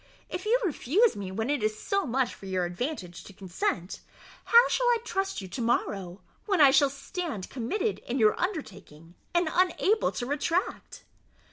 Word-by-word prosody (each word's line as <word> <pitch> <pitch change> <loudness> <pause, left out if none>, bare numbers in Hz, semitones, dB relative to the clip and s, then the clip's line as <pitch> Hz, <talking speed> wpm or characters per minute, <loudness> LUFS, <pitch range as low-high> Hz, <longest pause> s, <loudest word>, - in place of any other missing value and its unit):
If 360 +2 -5
you 485 +3 +4
refuse 375 - +2
me 195 -2 -5
when 220 +7 -2
it 290 -5 0
is 215 0 0
so 395 -4 -1
much 255 0 0
for 195 - -11
your 185 -1 0
advantage 180 - -5
to 200 - -12
consent, 185 -1 -3 0.5
how 470 +1 +7
shall - - +1
I 480 -1 +4
trust 390 - -2
you 190 - -7
to 250 - -5
morrow, 200 -6 -1 0.3
when 390 -4 +1
I 280 -3 +8
shall 280 0 +5
stand 280 - -5
committed 395 - -2
in 245 - -2
your 215 -4 +5
undertaking, 185 - -5 0.2
and 345 -1 +3
unable 375 +4 +2
to 245 - -3
retract?" 305 +7 -2
270 Hz, 170 wpm, -28 LUFS, -, 0.5 s, I